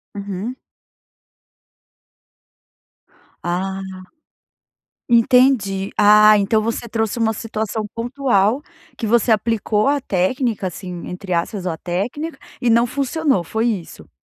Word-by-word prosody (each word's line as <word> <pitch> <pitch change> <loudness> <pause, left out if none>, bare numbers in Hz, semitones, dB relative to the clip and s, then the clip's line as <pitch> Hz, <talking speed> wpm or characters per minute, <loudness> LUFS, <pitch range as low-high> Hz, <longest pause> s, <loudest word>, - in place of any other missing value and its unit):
Uhum. 200 +4 -5 2.9
Ah. 190 +2 -2 1.3
Entendi. 230 -5 +3
Ah, 210 0 +7
então 210 +2 +2
você 230 +1 -3
trouxe 225 +1 -1
uma 225 -1 +1
situação 220 0 -3
pontual, 240 0 +1 0.3
que 225 - -3
você 235 +2 +2
aplicou 215 -1 +1
a 285 +1 +2
técnica 220 +1 -1
assim, 180 0 -8
entre 185 +1 -6
aspas, 180 +3 -2
ou 180 - 0
a - - -5
técnica 235 - -4 0.2
e 245 - +2
não 235 +1 +4
funcionou. 275 - 0
Foi 220 +7 -1
isso? 180 - -4
220 Hz, 110 wpm, -20 LUFS, 195-240 Hz, 2.9 s, Ah